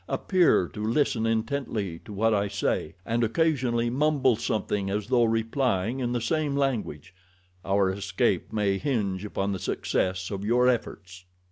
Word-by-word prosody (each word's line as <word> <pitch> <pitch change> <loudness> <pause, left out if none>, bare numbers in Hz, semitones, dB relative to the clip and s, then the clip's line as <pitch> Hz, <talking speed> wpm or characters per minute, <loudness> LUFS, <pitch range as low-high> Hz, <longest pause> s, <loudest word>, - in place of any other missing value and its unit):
Appear 180 - +3
to 105 +9 -7
listen 115 -1 +1
intently 110 -6 -2
to - - -10
what 110 +3 +1
I 100 -1 +1
say, 100 -5 -2
and 115 +1 0
occasionally 120 -3 +1
mumble 140 -2 +2
something 105 -3 -2
as 105 +1 -2
though 120 -2 +4
replying 115 0 0
in 120 -2 -1
the 120 - 0
same 145 +4 -1
language—our 95 - -2
escape 100 0 -1
may 100 -2 0
hinge 105 -9 -1
upon 100 -1 -2
the 95 - -3
success 95 +2 -1
of 100 -1 -4
your 120 +4 +3
efforts." 95 -7 -2
110 Hz, 145 wpm, -26 LUFS, 95-125 Hz, -, though